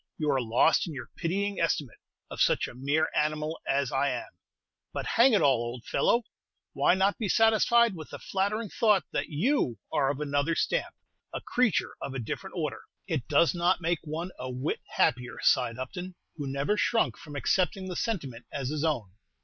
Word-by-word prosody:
You 150 -2 +1
are 135 -2 +2
lost 120 +10 +3
in 160 - -6
your 125 -3 -8
pitying 200 +4 -1
estimate 150 -7 -1 0.3
of - - -4
such - - +3
a - - -10
mere 140 +5 0
animal 155 +1 0
as 140 -2 +1
I 140 +1 +1
am; 125 -2 -4 0.6
but, - - -4
hang 240 +2 +4
it 210 - +4
all, 135 -4 +4
old 120 0 -5
fellow, 235 +1 +2 0.5
why - - +3
not 195 +2 +1
be 215 -4 -1
satisfied 225 +2 +4
with 155 -3 -9
the - - -7
flattering 205 +3 -1
thought 210 -4 +3
that - - -2
you 160 - +1 0.2
are 135 -2 +2
of 140 0 -2
another 145 +2 0
stamp, - - -1 0.4
a - - -4
creature 245 -7 +1
of 135 - -5
a - - -2
different 115 - -5
order?" - - -3 0.2
"It 120 - -2
does 150 +3 +4
not 175 +1 +2
make 170 -1 0
one 165 +4 -4
a 130 - -4
whit 130 +4 -2 0.2
happier," 125 0 +1
sighed 125 -3 +3
Upton, 180 +7 -6 0.2
who 145 -3 -5
never 140 +10 0
shrunk 230 +1 +2
from 150 -2 -11
accepting 185 +4 0
the 180 - -5
sentiment 145 - -3
as 135 -3 -3
his 150 0 -2
own. 125 - -1
155 Hz, 190 wpm, -28 LUFS, 135-190 Hz, 0.6 s, hang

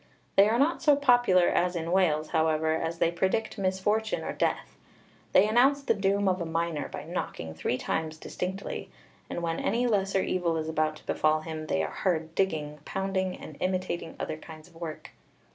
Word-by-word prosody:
They 200 +2 +6
are 230 - +2
not 290 +6 +2
so 295 -3 +5
popular 245 -10 +4
as 180 +1 +1
in 165 0 -2
Wales, 160 -5 +2
however, 160 -1 +2
as 165 +1 -2
they 165 - +2
predict 190 +6 -1
misfortune 200 +3 0
or - - -3
death. - - -1 0.6
They 195 +3 +6
announce 265 +6 +4
the - - +3
doom 200 -1 +1
of 185 -1 +1
a - - -1
miner 165 -2 -1
by - - -6
knocking 80 -1 -5
three 100 +10 -1
times 160 +2 -2
distinctly, 190 +4 -5 0.4
and 175 - -4
when 165 -1 -1
any 235 +4 +1
lesser 195 -4 +1
evil 170 -3 0
is 160 0 -3
about 155 -1 0
to - - -16
befall 155 0 +2
him 155 -1 -6
they 80 - +1
are 75 - -3
heard 160 -3 -1
digging, 150 -5 -1
pounding, 190 0 -2
and 155 - -10
imitating 185 -3 -2
other 155 - -3
kinds 155 0 -12
of 180 - -21
work. 165 -2 -7
175 Hz, 185 wpm, -28 LUFS, 160-195 Hz, 0.6 s, They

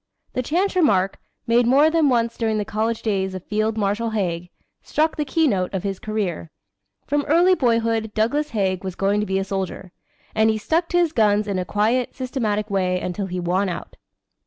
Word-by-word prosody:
The 255 - 0
chance 360 +10 0
remark, 195 - +2 0.3
made 235 +1 +3
more 285 +5 +5
than 320 -3 +3
once 235 -2 +1
during 220 -2 0
the 210 - -1
college 220 +2 -2
days 190 -3 -1
of 185 - -7
Field 215 +1 -1
Marshal 210 +2 0
Haig, 175 -5 -2 0.3
struck 315 +1 0
the 300 - -1
keynote 265 - +1
of 185 - -2
his 195 -2 -3
career. 200 -7 -3 0.6
From 290 +1 0
early 345 +5 +5
boyhood 230 - +1
Douglas 285 +8 +1
Haig 190 -4 -1
was 185 -2 -5
going 200 +1 +1
to 210 - -1
be 190 - 0
a 195 - 0
soldier; 190 -1 -4 0.4
and 220 0 +3
he 220 - +1
stuck 325 +10 0
to 350 - +1
his 345 -3 +3
guns 210 -3 +3
in 195 -2 -1
a 180 - -2
quiet, 220 +7 0
systematic 225 -5 -2
way 185 -2 +1
until 185 +2 -3
he 180 0 -4
won 185 +3 0
out. 170 - -6
215 Hz, 195 wpm, -22 LUFS, 195-255 Hz, 0.6 s, more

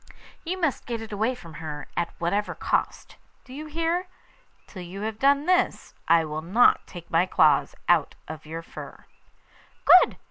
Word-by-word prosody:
You 370 +3 -4
must 315 -7 -1
get 235 -2 -3
it 225 -1 -9
away 220 +5 0
from 170 -9 -13
her 150 -2 -6
at 170 -1 -1
whatever 200 +5 -1
cost; - - -2 0.3
do 255 - -12
you 305 +3 -7
hear? 335 +4 -1 0.6
Till 185 - -10
you 180 +3 -8
have 215 0 -4
done 280 +1 +3
this 365 +1 +1
I 165 0 +4
won't 155 +7 -6 0.3
take 170 -2 -11
my 170 +3 +3
claws 155 -5 +3
out - - +2
of 155 0 -9
your 165 +1 -6
fur.' - - -11 0.8
'Good! 365 - +7
205 Hz, 165 wpm, -25 LUFS, -, 0.8 s, Good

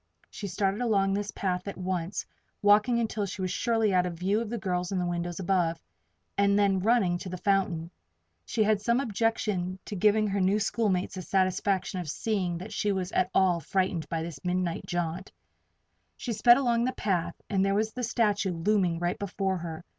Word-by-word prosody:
She 205 - -6
started 195 +3 -1
along 200 -5 +2
this 205 +1 -2
path 180 -2 -2
at 200 - -5
once, 185 0 -3 0.4
walking 210 +4 +5
until 215 -3 -1
she 190 0 -5
was 185 - -1
surely 225 -4 +1
out 180 -1 +3
of 170 -2 -6
view 195 +5 +1
of 230 - -4
the 235 - -3
girls 180 -3 -2
in 195 - -1
the 180 - 0
windows 175 0 -3
above, 175 -3 +1 0.6
and 200 0 +4
then 200 -2 +3
running 195 -4 +2
to 185 - -6
the 185 - -5
fountain. 180 -4 0 0.5
She 220 - 0
had 210 -1 +2
some 235 +3 +2
objection 210 -6 -1
to 210 - -5
giving 215 +3 +3
her 200 0 0
new 195 +3 +3
schoolmates 205 -4 0
the 185 - -5
satisfaction 185 +1 0
of 175 -4 -5
seeing 185 -1 -1
that 190 +5 -8
she 210 - 0
was 190 -1 -2
at 185 - +1
all 185 -3 +4
frightened 170 -1 -1
by 165 -1 -2
this 165 -5 -8
midnight 180 -1 -1
jaunt. 175 +1 -3 0.9
She 240 - -3
sped 240 +3 +6
along 240 -3 +2
the 255 - -1
path 175 -4 -1
and 195 -2 +1
there 195 0 +2
was 215 +1 +1
the 250 - -6
statue 210 -5 +1
looming 180 0 +1
right 175 +1 -2
before 195 -1 -1
her. 165 -2 -7
195 Hz, 195 wpm, -28 LUFS, 180-210 Hz, 0.9 s, sped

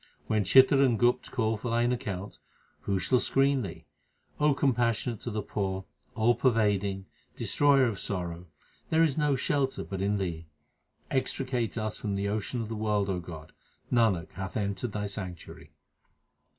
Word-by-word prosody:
When 110 -1 +1
Chitr 135 +5 +6
and 120 -4 +3
Gupt 120 +1 +2
call 110 -2 0
for 120 +4 -4
thine 120 +1 +2
account, 100 -5 -4 0.4
who 100 - -1
shall 125 +8 +2
screen 135 +1 +2
thee? 95 -7 -7 0.5
O 150 -1 +3
Compassionate 120 -4 +1
to - - -4
the 105 -2 -3
poor, 95 -2 -3 0.3
All 115 +1 +4
pervading, 100 -6 +1 0.3
Destroyer 140 -2 +3
of 115 -5 -2
sorrow, 90 -2 -4 0.4
there 160 +1 +4
is 150 -5 +2
no 150 -3 +2
shelter 135 +1 0
but 95 -1 -5
in 100 +1 +1
Thee. 85 -4 -4 0.6
Extricate 130 -4 -1
us 110 -1 -3
from 100 -3 -2
the 100 +1 -1
ocean 110 +3 -2
of - - -6
the 115 - -3
world, 105 -2 0
O 90 - -1
God; 80 -3 -9 0.4
Nanak 110 -8 +2
hath 95 +4 -5
entered 100 +1 -2
Thy 105 -1 -2
sanctuary. 95 -4 -7
110 Hz, 160 wpm, -29 LUFS, 100-125 Hz, 0.6 s, Chitr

